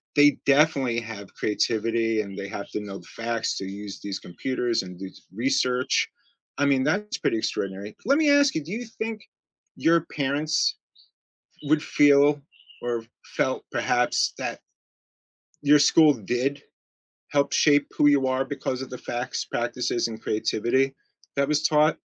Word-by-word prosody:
they 145 Hz, -1 st, +6 dB
definitely 140 Hz, -5 st, +3 dB
have 110 Hz, -4 st, -9 dB
creativity 115 Hz, +1 st, 0 dB
and 100 Hz, -1 st, -8 dB
they 100 Hz, 0 st, -5 dB
have 100 Hz, +1 st, -7 dB
to 105 Hz, -, -3 dB
know 100 Hz, -1 st, -7 dB
the -, -, -15 dB
facts 115 Hz, 0 st, -2 dB
to 95 Hz, -, -4 dB
use 100 Hz, +1 st, -7 dB
these 100 Hz, -1 st, -4 dB
computers 120 Hz, +4 st, -2 dB
and 90 Hz, -1 st, -10 dB
do 95 Hz, -, -5 dB, 0.3 s
research. 125 Hz, +2 st, +1 dB, 0.5 s
I 145 Hz, -, +2 dB
mean 135 Hz, -2 st, +3 dB
that 200 Hz, +8 st, 0 dB
is -, -, -3 dB
pretty 115 Hz, -, 0 dB
extraordinary. 100 Hz, -1 st, -3 dB
Let 275 Hz, +4 st, +4 dB
me 310 Hz, -2 st, +3 dB
ask 285 Hz, -1 st, +5 dB
you, 155 Hz, -, -2 dB
do 175 Hz, +7 st, -7 dB
you 240 Hz, +2 st, -3 dB
think 220 Hz, -1 st, -4 dB, 0.6 s
your 165 Hz, 0 st, +3 dB
parents 145 Hz, +2 st, 0 dB, 0.9 s
would 150 Hz, +1 st, +2 dB
feel 145 Hz, 0 st, +4 dB, 0.4 s
or 120 Hz, -1 st, -2 dB, 0.3 s
felt -, -, 0 dB
perhaps -, -, +1 dB
that -, -, -4 dB, 1.0 s
your 150 Hz, +1 st, +6 dB
school 150 Hz, +1 st, +6 dB
did 125 Hz, +6 st, -2 dB, 0.7 s
help 140 Hz, -1 st, +2 dB
shape 145 Hz, -1 st, +4 dB
who 145 Hz, -, +5 dB
you 140 Hz, -2 st, +4 dB
are 130 Hz, +1 st, 0 dB
because 135 Hz, -2 st, -3 dB
of 130 Hz, -, -10 dB
the 125 Hz, -, -5 dB
facts, 120 Hz, +1 st, -4 dB
practices, 120 Hz, 0 st, -1 dB
and 110 Hz, -1 st, -8 dB
creativity 120 Hz, +5 st, 0 dB, 0.4 s
that 140 Hz, 0 st, +1 dB
was 150 Hz, 0 st, +1 dB
taught. 150 Hz, +1 st, +3 dB
130 Hz, 155 wpm, -25 LUFS, 115-145 Hz, 1.0 s, they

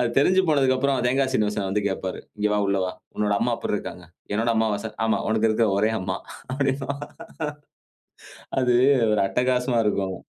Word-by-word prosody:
அது 120 Hz, -, +2 dB
தெரிஞ்சு 185 Hz, +7 st, +4 dB
போனதுக்கப்புறம் 135 Hz, -2 st, +2 dB
தேங்காய் 130 Hz, +1 st, +1 dB
சீனிவாசன் 105 Hz, -4 st, 0 dB
வந்து 105 Hz, -, +1 dB
கேப்பாரு. 95 Hz, -1 st, -3 dB, 0.2 s
"இங்க 105 Hz, 0 st, +1 dB
வா 105 Hz, -, +2 dB
உள்ள 100 Hz, 0 st, +1 dB
வா. 90 Hz, -, -2 dB, 0.3 s
உன்னோட 105 Hz, -1 st, +1 dB
அம்மா -, -, +1 dB
எப்பிற்ருக்காங்க? 90 Hz, -, -4 dB, 0.3 s
என்னோட 115 Hz, +2 st, +1 dB
அம்மாவா 110 Hz, -2 st, +2 dB
சார்? 110 Hz, -1 st, -6 dB
ஆமா, 110 Hz, -, +2 dB
உனக்கு 110 Hz, 0 st, +2 dB
இருக்கிற 110 Hz, 0 st, +2 dB
ஒரே 110 Hz, +2 st, +2 dB
அம்மா" 95 Hz, 0 st, -2 dB, 0.4 s
அப்டின்பான். 135 Hz, +1 st, -2 dB, 1.6 s
அது 125 Hz, -1 st, +3 dB, 0.4 s
ஒரு 105 Hz, -2 st, +2 dB
அட்டகாசமா 125 Hz, +3 st, +1 dB
இருக்கும். 95 Hz, -2 st, -1 dB
110 Hz, 155 wpm, -24 LUFS, 105-130 Hz, 1.6 s, தெரிஞ்சு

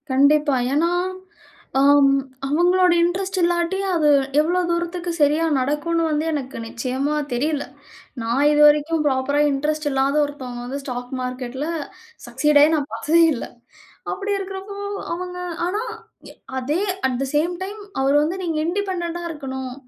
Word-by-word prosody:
கண்டிப்பா. 285 Hz, +2 st, +4 dB, 0.2 s
ஏன்னா, 330 Hz, +4 st, +2 dB, 0.9 s
அம் 280 Hz, 0 st, +5 dB, 0.4 s
அவங்களோட 355 Hz, +4 st, +4 dB
இன்ட்ரெஸ்ட் 375 Hz, +2 st, -1 dB
இல்லாட்டி, 345 Hz, +2 st, +1 dB, 0.2 s
அது 305 Hz, -3 st, +3 dB, 0.3 s
எவ்வளோ 340 Hz, +4 st, +2 dB
தூரத்துக்கு 345 Hz, +1 st, -2 dB
சரியா 300 Hz, +3 st, +3 dB
நடக்கும்ன்னு 300 Hz, +5 st, 0 dB
வந்து 305 Hz, +1 st, 0 dB
எனக்கு 270 Hz, -3 st, -4 dB
நிச்சயமா 260 Hz, +5 st, -2 dB, 0.2 s
தெரியல! 285 Hz, +4 st, -1 dB, 0.6 s
நான் 235 Hz, +5 st, +1 dB
இதுவரைக்கும் 300 Hz, +2 st, +4 dB
ப்ராப்பரா 280 Hz, +2 st, +1 dB
இன்ட்ரெஸ்ட் 300 Hz, +2 st, -1 dB
இல்லாத 270 Hz, +1 st, +1 dB
ஒருத்தவங்க 255 Hz, -4 st, -7 dB
வந்து, 275 Hz, +3 st, -5 dB
ஸ்டாக் 245 Hz, -1 st, -6 dB
மார்க்கெட்ல 255 Hz, +3 st, -4 dB, 0.6 s
சக்சீட் 290 Hz, +5 st, +3 dB
ஆயி 310 Hz, +2 st, +4 dB
நான் 290 Hz, -2 st, -2 dB
பார்த்ததே 315 Hz, +9 st, +3 dB
இல்ல. 240 Hz, -, -4 dB, 0.7 s
அப்படி 400 Hz, +2 st, -3 dB
இருக்கிறப்போ, 390 Hz, +1 st, -7 dB, 0.4 s
அவங்க 360 Hz, +1 st, -5 dB, 0.3 s
ஆனா, 410 Hz, +4 st, -1 dB, 0.5 s
ய -, -, -13 dB, 0.2 s
அதே 285 Hz, +6 st, -1 dB, 0.3 s
அட் 255 Hz, -2 st, -2 dB
தே -, -, 0 dB
சேம் 325 Hz, +4 st, +2 dB
டைம், 410 Hz, +2 st, -7 dB, 0.2 s
அவரு 275 Hz, +1 st, +2 dB
வந்து, 335 Hz, +5 st, -2 dB
நீங்க 330 Hz, -3 st, -2 dB
இண்டிபெண்டென்டா 345 Hz, -2 st, -2 dB
இருக்கணும். 265 Hz, -4 st, -5 dB
300 Hz, 135 wpm, -22 LUFS, 270-345 Hz, 0.9 s, அம்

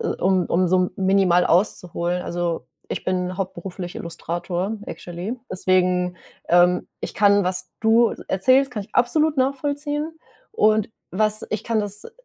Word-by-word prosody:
äh, -, -, -2 dB
um 185 Hz, -1 st, +1 dB
um 180 Hz, +1 st, +2 dB
so 185 Hz, 0 st, +2 dB
minimal 190 Hz, -2 st, +3 dB
auszuholen 175 Hz, -1 st, +1 dB
also, 170 Hz, -6 st, -3 dB, 0.2 s
ich -, -, -4 dB
bin 185 Hz, 0 st, -1 dB
hauptberuflich 185 Hz, -1 st, -5 dB
Illustrator, 175 Hz, +3 st, -3 dB
actually, 175 Hz, +7 st, -6 dB
deswegen, 180 Hz, -1 st, +1 dB, 0.3 s
ähm, 175 Hz, +1 st, +4 dB
ich -, -, -5 dB
kann 200 Hz, 0 st, +4 dB
was 180 Hz, 0 st, -2 dB
du 225 Hz, +1 st, +4 dB, 0.2 s
erzählst, 260 Hz, +8 st, +3 dB
kann 215 Hz, -4 st, -4 dB
ich -, -, -25 dB
absolut 300 Hz, +5 st, +3 dB
nachvollziehen 290 Hz, +3 st, -1 dB, 0.4 s
und 215 Hz, -, +3 dB, 0.2 s
was 215 Hz, +3 st, 0 dB
ich 215 Hz, -, -3 dB
kann 225 Hz, -2 st, +1 dB
das 205 Hz, 0 st, -2 dB
äh, -, -, -9 dB
190 Hz, 140 wpm, -22 LUFS, 180-220 Hz, 0.4 s, ähm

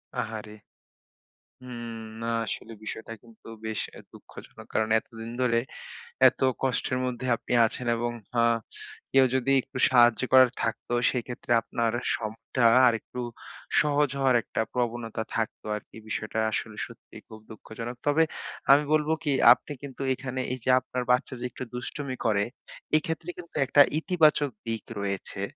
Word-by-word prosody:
আহারে! 110 Hz, -1 st, -4 dB, 1.1 s
হুম, 120 Hz, -2 st, -7 dB, 0.2 s
না 115 Hz, -, -3 dB, 0.2 s
আসলে 115 Hz, -, -5 dB
বিষয়টা 110 Hz, +1 st, -6 dB
কিন্তু 115 Hz, -2 st, -18 dB, 0.2 s
বেশ 110 Hz, -1 st, -2 dB, 0.2 s
এ -, -, -10 dB
দুঃখজনক। -, -, -13 dB
কারণ 110 Hz, 0 st, +1 dB
এতদিন 115 Hz, 0 st, -10 dB
ধরে 115 Hz, -2 st, +3 dB, 0.7 s
এত -, -, 0 dB, 0.2 s
কষ্টের 130 Hz, -1 st, 0 dB
মধ্যে 125 Hz, 0 st, -4 dB
আপনি 115 Hz, -, -5 dB
আছেন 120 Hz, +2 st, -3 dB
এবং 120 Hz, +1 st, -1 dB, 0.3 s
আ -, -, +4 dB, 0.7 s
কেউ 135 Hz, -1 st, +7 dB
যদি 130 Hz, +1 st, +1 dB
একটু 135 Hz, +1 st, -10 dB
সাহায্য 120 Hz, -3 st, +5 dB
করার 130 Hz, -2 st, +8 dB
থাকতো, 115 Hz, +1 st, -2 dB, 0.2 s
সেক্ষেত্রে 120 Hz, -1 st, -5 dB
আপনার 115 Hz, -1 st, -1 dB, 0.2 s
শখটা 115 Hz, +2 st, -2 dB, 0.2 s
আরেকটু 115 Hz, +1 st, -2 dB, 0.6 s
সহজ 150 Hz, -1 st, +2 dB
হওয়ার 135 Hz, -2 st, +3 dB
একটা -, -, -2 dB
প্রবণতা 120 Hz, -2 st, -2 dB
থাকত 115 Hz, -2 st, -2 dB
আরকি। 105 Hz, -, -10 dB
বিষয়টা 110 Hz, 0 st, -3 dB
আসলে 110 Hz, 0 st, -4 dB
সত্যিই -, -, -14 dB
খুব 110 Hz, -, -11 dB
দুঃখজনক। 115 Hz, +2 st, -7 dB
তবে 150 Hz, +3 st, +4 dB, 0.5 s
আমি 140 Hz, +2 st, +7 dB
বলব 150 Hz, 0 st, +2 dB
কি 145 Hz, -, +1 dB, 0.2 s
আপনি 140 Hz, -, -11 dB
কিন্তু 140 Hz, -1 st, -8 dB
এখানে, 130 Hz, 0 st, -4 dB
এই 130 Hz, -, -5 dB
যে -, -, -1 dB
আপনার 125 Hz, 0 st, -4 dB
বাচ্চা 125 Hz, +2 st, +1 dB
যে 125 Hz, -, -4 dB
একটু 130 Hz, -, -7 dB
দুষ্টুমি 130 Hz, +2 st, -5 dB
করে, 100 Hz, -3 st, +3 dB, 0.5 s
এক্ষেত্রে 160 Hz, +2 st, -4 dB
কিন্তু 170 Hz, -1 st, -11 dB
একটা 145 Hz, +2 st, +5 dB, 0.2 s
ইতিবাচক 155 Hz, -4 st, +3 dB, 0.2 s
দিক 115 Hz, -3 st, -3 dB, 0.2 s
রয়েছে। 100 Hz, 0 st, -4 dB
120 Hz, 145 wpm, -27 LUFS, 115-130 Hz, 1.1 s, করার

